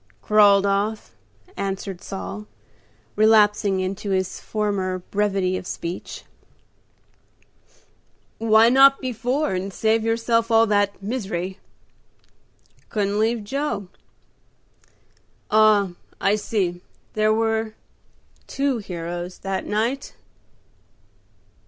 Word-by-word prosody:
"Crawled 205 -2 +5
off," 205 +2 -1 0.4
answered 195 -1 -4
Saul, 210 +2 -7 0.7
relapsing 210 -2 +4
into 195 +2 -4
his 190 -1 -1
former 200 -4 -2
brevity 195 -1 -1
of 180 - -8
speech. 170 +2 -6 2.2
"Why 225 0 +5
not 270 +2 +6
before, 255 +2 -1
and 190 +2 -3
save 220 +3 +1
yourself 230 0 +1
all 225 0 +5
that 205 -2 0
misery?" 195 -5 -4 1.3
"Couldn't 205 -1 -1
leave 225 0 +1
Joe." 270 -4 -3 1.6
"Ah, 210 -3 +4 0.3
I 200 +1 +2
see; 190 -5 -2 0.3
there 215 0 +2
were 220 0 0 0.7
two 275 -3 -1
heroes 175 -2 -6
that 195 -1 -3
night." 230 +6 -2
210 Hz, 90 wpm, -23 LUFS, 195-225 Hz, 2.2 s, not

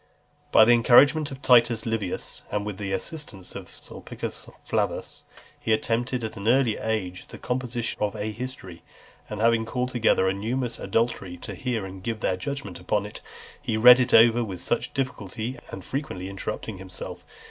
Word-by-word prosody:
XLI. - - -35
By 110 - +8
the 120 - +5
encouragement 140 +6 +6
of 135 0 -10
Titus 120 -2 +5
Livius, 110 -5 -3
and 105 0 -2
with 105 -2 -5
the 100 -1 -3
assistance 95 - -4
of - - -8
Sulpicius - - -7 0.2
Flavus, - - -2 0.4
he 110 - +1
attempted 120 +3 0
at 110 - -4
an 100 +2 -5
early 120 -2 +4
age 100 -5 -3
the - - -10
composition 125 -2 -3
of 105 -1 0
a 105 +1 -3
history; 105 -7 -7 0.5
and 105 - -5
having 115 0 +4
called 125 +3 -2
together 115 -6 +2
a 95 - +2
numerous 115 +4 -2
auditory, 100 -4 -1
to - - -6
hear 120 -6 -2
and 95 0 -9
give 115 +2 -3
their 95 - +1
judgment 100 -3 -5
upon 100 +3 0
it, 105 - -9 0.4
he 110 - -1
read 125 +3 +9
it 125 - +1
over 115 +1 +6
with 95 -5 -6
much 120 - 0
difficulty, 120 -1 -3
and 95 - -8
frequently 95 -10 -4
interrupting 100 +1 -5
himself. 95 -1 -8
115 Hz, 175 wpm, -25 LUFS, 100-125 Hz, 0.5 s, read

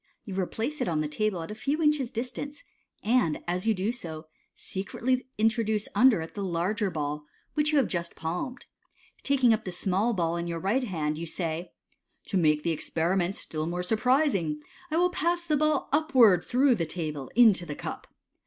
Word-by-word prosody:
You 200 - -6
replace 225 +10 -2
it - - 0
on 160 -3 0
the 155 - -1
table 180 +3 -1
at 165 - -7
a - - -3
few 275 +8 -2
inches' 300 -5 +2
dis 240 +2 -3
tance, 290 - -7 0.4
and 220 -8 +2
as 180 +4 -1
you 220 - +3
do 195 +4 0
so, 160 -9 -7 0.3
secretly 250 +7 -2
introduce 220 -1 +1
under 250 -8 +5
it 160 - -7
the 200 - -4
larger 190 +4 0
ball 150 -2 -4 0.3
which 300 0 +1
you 305 - +3
have 270 - +4
just 170 -3 -3
palmed. 180 +10 -4 0.6
Taking 260 -4 +4
up 220 0 -1
the 185 - -5
small 195 +6 0
ball 170 -2 0
in 170 0 -3
your 170 -1 -3
right 210 +9 +1
hand, 155 -6 -2
you 170 - -4
say, 165 0 -3 0.6
To 195 - +1
make 150 -3 +3
the 170 - +1
experiment 175 +4 0
still 155 0 -4
more 175 +1 -2
surprising, 220 - +1 0.3
I 315 - 0
will 355 +1 +3
pass 345 +1 0
the 310 -3 +2
ball 305 -1 +1
upwards 260 - +5
through 260 +2 +4
the 170 -8 -1
table 155 -5 -4
into 215 -7 +5
the 150 - -4
cup." - - -6
200 Hz, 190 wpm, -28 LUFS, 170-255 Hz, 0.6 s, under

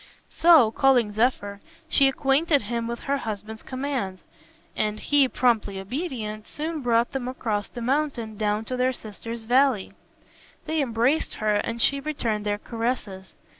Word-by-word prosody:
So, 320 -10 +6
calling 245 -4 +3
Zephyr, 205 -3 0 0.3
she 280 -3 +4
acquainted 275 +1 +2
him 230 +2 -3
with 235 0 -5
her 280 0 0
husband's 220 -2 -6
commands, 255 -8 -3 0.6
and 215 0 -1
he, 285 -2 +3
promptly 225 -6 +1
obedient, 215 - -5
soon 310 +1 -4
brought 235 -1 +2
them 265 -3 -3
across 220 -5 -2
the 240 - -7
mountain 260 -4 -1
down 210 +1 -1
to 255 - -3
their 255 +1 +1
sister's 230 +1 -7
valley. 245 -3 +2 0.7
They 315 -1 0
embraced 250 +4 +1
her 215 -1 0
and 230 +3 -1
she 280 +4 +3
returned 230 -8 -2
their 205 0 0
caresses. 225 -4 -4
235 Hz, 145 wpm, -25 LUFS, 215-270 Hz, 0.7 s, So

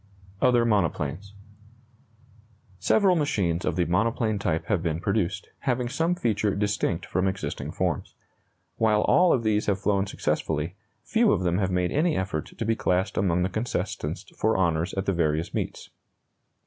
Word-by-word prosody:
OTHER 120 -2 +4
MONOPLANES. 100 -2 -1 1.4
Several 195 -4 +3
machines 95 - 0
of - - 0
the 90 -1 +1
monoplane 110 +3 +1
type 85 -6 -1
have 100 -6 0
been 80 -2 -1
produced, 95 -1 -1
having 125 -2 -1
some 165 +6 0
feature 105 - 0
distinct 100 -4 -1
from 95 +2 0
existing 95 +1 -3
forms. - - -2 0.6
While 110 -2 +3
all 180 +9 +4
of 120 - +2
these 110 -1 +1
have 100 -2 +1
flown 100 0 +1
successfully, 80 -2 -2 0.3
few 225 - +3
of - - +1
them 90 +1 +1
have 95 -2 +1
made 90 -1 0
any 155 +3 +1
effort 95 -5 -3
to 115 - -2
be 115 +1 +2
classed 90 -1 0
among 90 -2 +1
the 95 - 0
contestants 110 +5 -3
for 110 -2 +1
honors 85 -1 0
at 95 0 -2
the 95 - +1
various 80 -1 0
meets. - - -4
100 Hz, 160 wpm, -26 LUFS, 90-115 Hz, 1.4 s, OTHER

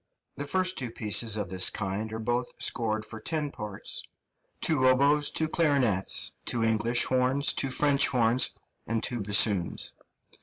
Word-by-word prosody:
The 145 - -6
two - - -9
first 185 -2 0
pieces 110 0 +2
of 100 -4 -4
this 95 0 +3
kind 105 +2 -4
are 110 - -5
both 120 +2 -3
scored 110 -2 -1
for 110 - -9
ten 150 +4 -3
parts, 105 -2 -5 0.6
two 140 -5 +1
oboes, 140 +3 +3
two 160 - 0
clarinets, 140 - +1
two 115 -2 -2
English 115 +2 +2
horns, 130 +2 +1
two 135 - -3
French 140 +1 +3
horns, 125 -1 +2 0.4
and 115 0 -2
two 120 -2 -2
bassoons. 100 -3 +1
120 Hz, 150 wpm, -27 LUFS, 110-140 Hz, 0.6 s, this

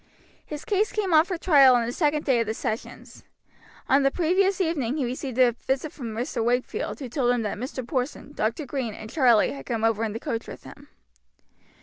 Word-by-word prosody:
His 300 -1 -7
case 420 -1 +1
came 395 -5 -1
on 315 +1 +6
for 365 -2 -3
trial 280 -7 +6
on 235 -1 +1
the 235 - -3
second 300 +2 0
day 260 -4 +3
of 230 - 0
the 220 - -2
sessions. 220 0 -6 0.6
On 270 +2 +4
the 275 - +4
previous 370 +5 +1
evening 310 -7 -1
he 275 - 0
received 255 0 -5
a 250 -2 +5
visit 265 +5 -3
from 230 -6 -7
Mr. 235 0 -2
Wakefield, 245 - -1
who 270 - -5
told 245 0 0
him 245 -2 0
that 210 -1 -3
Mr. 255 0 -5
Porson, 265 +1 -3
Dr. 235 +4 -2
Green 245 -5 -4
and 220 - -9
Charlie 245 - +4
had 135 -1 -9
come 225 -2 -2
over 225 -1 +2
in 215 -2 -2
the 225 - -5
coach 230 0 -4
with - - -10
him. - - -13
260 Hz, 215 wpm, -25 LUFS, 230-305 Hz, 0.6 s, on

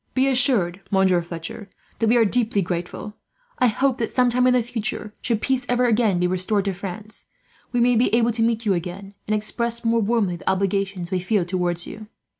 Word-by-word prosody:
"Be 265 +1 +3
assured, 245 -9 +2
Monsieur 190 -2 +3
Fletcher, 170 +4 -8 0.3
that 225 - +1
we 235 +2 +4
are 230 - +5
deeply 215 -2 +1
grateful. 175 +5 -5 0.4
I 250 - +5
hope 260 +3 +1
that 230 - -3
some 250 -1 +3
time 250 +1 +3
in 250 - +4
the 245 - +2
future, 220 -2 -4
should 230 -3 -1
peace 265 -1 +1
ever 245 0 +2
again 220 -5 +2
be 180 - +1
restored 185 +3 0
to 195 - -1
France, 200 +3 -8 0.4
we 245 - 0
may 245 +1 +4
be 235 +2 +2
able 235 0 +3
to 225 0 -1
meet 230 0 +1
you 200 - +3
again, 185 +3 -5
and 215 - +1
express 235 +2 -2
more 230 0 +2
warmly 205 -5 0
the - - -3
obligations 195 -1 -1
we 185 - 0
feel 185 0 0
towards 175 -1 -1
you." 215 0 -9
215 Hz, 210 wpm, -22 LUFS, 185-235 Hz, 0.4 s, are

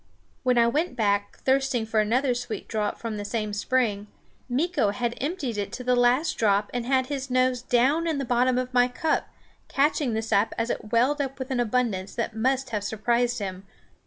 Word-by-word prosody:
When 250 -2 +2
I 235 - +6
went 290 +4 0
back, 205 -3 0
thirsting 265 -3 +1
for 220 0 0
another 245 +5 +2
sweet 240 -3 -5
draught 210 -2 -2
from 225 -2 -5
the 205 - -4
same 215 0 -3
spring, 210 -2 0 0.4
Meeko 280 - +1
had 240 +2 -2
emptied 275 - -2
it 200 -1 -3
to 250 - -5
the 250 0 +2
last 245 +6 +2
drop 205 -1 +2
and 245 -1 -3
had 260 -1 +2
his 270 0 -4
nose 255 -1 +2
down 265 +7 +2
in 320 -3 0
the 275 - -2
bottom 250 +1 +2
of 255 0 -2
my 245 0 +5
cup, 310 +6 -1 0.4
catching 280 -3 +1
the 220 - -1
sap 215 -1 +1
as 230 +1 0
it 215 - -5
welled 260 +6 +3
up 270 -1 -4
with 260 0 -6
an 255 - 0
abundance 225 -5 -1
that 230 -1 -3
must 260 +3 0
have 210 -2 -2
surprised 235 +3 0
him. 195 -2 -5
245 Hz, 200 wpm, -26 LUFS, 220-260 Hz, 0.4 s, I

